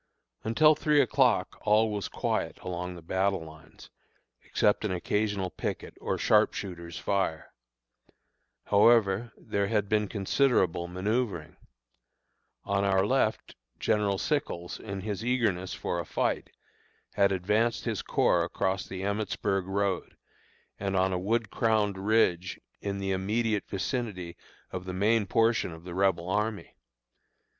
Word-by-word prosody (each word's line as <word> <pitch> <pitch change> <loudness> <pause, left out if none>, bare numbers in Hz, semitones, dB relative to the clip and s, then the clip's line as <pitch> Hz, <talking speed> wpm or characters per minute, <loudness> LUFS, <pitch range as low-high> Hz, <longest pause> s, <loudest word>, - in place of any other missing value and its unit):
Until 150 +8 +5
three 150 0 +2
o'clock 120 -11 +2
all 110 +1 +3
was 105 -2 -3
quiet - - -2
along 90 0 -4
the 85 - -11
battle 95 0 0
lines, 80 0 -14 0.5
except 105 - +1
an 105 - -1
occasional 100 +1 -1
picket - - -5
or - - -1
sharpshooter's 85 -3 +1
fire. 95 -5 -1 1.1
However, 105 +1 +4
there 100 0 -1
had 105 -1 0
been 105 0 +1
considerable 95 - +1
manoeuvring. 95 -3 -2 1.1
On 100 0 0
our 95 -1 +3
left 120 -2 0 0.2
General 105 -2 +1
Sickles, 95 - -2
in 100 -3 -6
his 105 +1 -4
eagerness 110 -7 0
for 85 - -2
a 85 - -4
fight, - - -1 0.6
had 100 -1 +3
advanced 105 +5 +1
his - - -1
corps - - +2
across 95 0 -1
the 95 0 -6
Emmitsburg 100 -2 -1
road, 95 -1 -1 0.6
and 95 -1 -2
on 95 0 +2
a 90 - 0
wood 110 +3 0
crowned 105 -4 +1
ridge 95 -4 +1 0.2
in 100 -1 -3
the 95 0 -2
immediate 105 +3 0
vicinity 95 -5 -3 0.4
of 90 0 -5
the 90 - -5
main 105 +2 +2
portion 115 -1 +2
of 80 0 -11
the 90 -1 -7
Rebel 95 -2 +1
army. 105 +2 -2
100 Hz, 130 wpm, -29 LUFS, 90-110 Hz, 1.1 s, Until